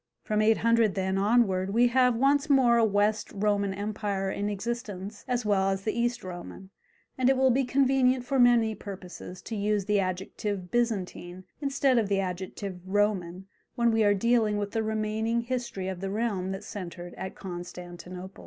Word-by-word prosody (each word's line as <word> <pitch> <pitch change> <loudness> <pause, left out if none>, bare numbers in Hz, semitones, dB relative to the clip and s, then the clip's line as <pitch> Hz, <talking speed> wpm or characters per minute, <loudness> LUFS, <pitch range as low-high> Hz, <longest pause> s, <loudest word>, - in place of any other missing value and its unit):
From 215 -1 0
800, 225 -1 +3
then, 190 0 0
onward 200 -3 +2
we 240 +1 +5
have 250 -1 +3
once 280 +4 +2
more 255 -4 +5
a 230 - +4
West 210 0 +1
Roman 200 -1 +1
empire 200 -1 -2
in 205 +1 -2
existence 205 -2 -5
as 245 -2 -1
well 195 -2 +2
as 195 0 -2
the 215 - -1
East 240 0 -1
Roman, 185 +1 -9 0.5
and 255 0 +4
it 265 - +3
will 260 0 +4
be 265 +3 +2
convenient 260 -1 +2
for 270 +1 0
many 240 -3 +5
purposes 185 -3 -9
to 225 - -5
use 205 -1 0
the 210 0 +2
adjective 185 0 -3
Byzantine 190 -6 -2 0.2
instead 275 -3 +2
of 210 -3 -1
the 200 -1 +2
adjective 185 0 -4
Roman, 190 -2 0 0.3
when 235 -2 +3
we 225 -1 +3
are 205 -1 +4
dealing 220 0 +2
with 205 -1 -3
the 225 - 0
remaining 220 +1 -1
history 235 -6 -4
of 190 -1 -5
the 195 - -3
realm 200 -3 -1
that 195 +1 -5
centred 175 -4 -7
at 190 - -7
Constantinople. 180 0 -8
210 Hz, 170 wpm, -28 LUFS, 190-235 Hz, 0.5 s, we